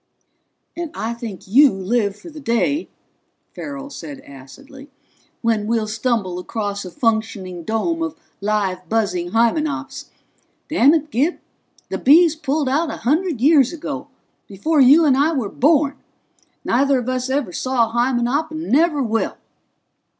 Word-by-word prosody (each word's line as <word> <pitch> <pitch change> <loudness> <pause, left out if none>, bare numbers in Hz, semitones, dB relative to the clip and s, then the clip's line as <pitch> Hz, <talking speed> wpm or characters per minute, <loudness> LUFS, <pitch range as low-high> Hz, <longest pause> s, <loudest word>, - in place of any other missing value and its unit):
"And 345 -1 -4
I 225 +2 -3
think 230 -6 -8
you 270 +7 +6
live 200 +2 -1
for 325 +11 -12
the 305 - -10
day," 285 +4 0 0.6
Farrell 280 -1 -7
said 155 - -8
acidly, 270 - -14 0.5
"when 220 -2 +1
we'll 225 -1 0
stumble 215 -4 -1
across 205 +1 -4
a 185 - -7
functioning 220 -4 -2
dome 275 - -1
of 325 -2 -3 0.3
live, 195 -4 -1
buzzing 180 -6 0
Hymenops. 280 +5 0 0.6
Damn 295 0 +5
it, 310 -1 -2
Gib, 290 +9 +1 0.5
the - - -3
Bees 325 +4 +5
pulled 295 -1 -1
out 300 +5 +1
a - - -5
hundred 310 -1 +1
years 280 -2 +5
ago, 335 - -6 0.4
before 280 - +1
you 290 +6 +7
and 275 -3 +4
I 295 +4 +2
were 250 -9 -2
born 285 +2 +2 0.7
neither 275 +2 +2
of 245 -1 -4
us 255 0 -2
ever 265 -9 -1
saw 255 0 +1
a - - -15
Hymenop, 245 +5 +1
and 315 +1 -6
never 300 0 +3
will!" 225 -1 -1
255 Hz, 145 wpm, -20 LUFS, 220-295 Hz, 0.7 s, you